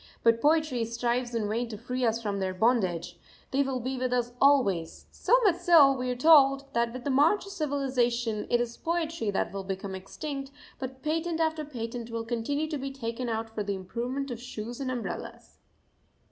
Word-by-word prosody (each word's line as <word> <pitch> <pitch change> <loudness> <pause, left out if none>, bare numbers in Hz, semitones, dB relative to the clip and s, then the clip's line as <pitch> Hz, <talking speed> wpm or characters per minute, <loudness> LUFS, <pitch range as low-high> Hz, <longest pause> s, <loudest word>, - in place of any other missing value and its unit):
But 230 0 +4
poetry 300 -5 +2
strives 235 +1 -1
in 220 -2 0
vain 230 +3 -1
to 215 - -6
free 250 +3 -3
us 230 0 +1
from 200 -2 -2
their 190 -1 -2
bondage 185 -6 +1 0.3
they 275 - +2
will 265 -2 -1
be 255 +1 -3
with 255 -1 -1
us 245 -1 0
always; 200 -13 +3
so - - +3
much 370 -5 +4
so, 340 -6 +7
we 255 -2 -2
are 250 - -1
told, 275 -1 +6
that 235 0 +1
with 255 +1 -7
the 280 - -1
march 315 +11 +3
of 395 - -9
civilisation 250 - 0
it 240 - +3
is 235 -1 -3
poetry 330 -8 -1
that 195 - -1
will 195 -1 -4
become 190 0 -4
extinct, 275 +9 -6 0.3
but 260 0 -7
patent 325 +2 -1
after 320 -1 0
patent 235 -4 -6
will 230 0 -4
continue 245 +6 -1
to 300 -3 -3
be 275 +1 -3
taken 245 -2 -4
out 225 0 -2
for 220 -1 -5
the 200 -1 -2
improvement 245 +8 -4
of 240 -1 -6
shoes 240 -1 -6
and 270 -2 -2
umbrellas. 245 -3 -6
245 Hz, 195 wpm, -28 LUFS, 225-280 Hz, 0.3 s, so